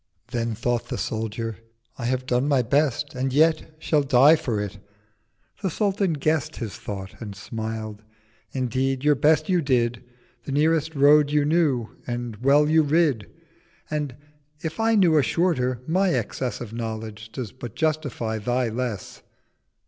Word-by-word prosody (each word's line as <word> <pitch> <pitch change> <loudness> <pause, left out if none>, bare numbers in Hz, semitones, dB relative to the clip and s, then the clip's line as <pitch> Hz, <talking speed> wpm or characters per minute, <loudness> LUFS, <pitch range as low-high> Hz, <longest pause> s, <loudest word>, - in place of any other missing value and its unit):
—660 - - -25
Then 115 -1 -2
thought 120 +1 -1
the 125 -1 -4
Soldier—'I 115 +2 -5
have 130 +1 -1
done 125 +2 +1
my 135 -4 +3
Best, 145 +3 +1
And 130 0 -1
yet 155 +2 +2
shall 155 -1 +1
die 140 +3 +6
for 115 -8 -2
it.' 105 0 -5 0.8
The 195 - 0
Sultan 195 -1 0
guess'd 155 +1 0
His 115 -5 -5
Thought 95 0 -7
and 105 -3 -6
smiled. 110 0 -5 0.5
'Indeed 130 +1 -1
your 150 0 +5
Best 150 +3 +3
you 180 -3 +2
did, 120 -4 +1 0.4
The 135 - -4
nearest 160 +1 +2
Road 145 +1 +6
you 150 0 +2
knew, 145 -8 +2 0.2
and 120 -2 -4
well 140 +5 +4
you 160 +1 +5
rid: 150 -7 +1 0.6
And 150 -4 -2 0.5
if 160 +3 -4
I 225 0 +3
knew 170 -7 +5
a - - +5
shorter, 130 -4 0
my 185 +5 +2
Excess 125 +2 -3
Of 115 -2 -7
Knowledge 110 -1 -6
does 125 -7 -5
but 120 -2 -9
justify 145 -8 -1
thy 125 +2 0
Less.' 115 -4 -4
130 Hz, 155 wpm, -24 LUFS, 115-155 Hz, 0.8 s, die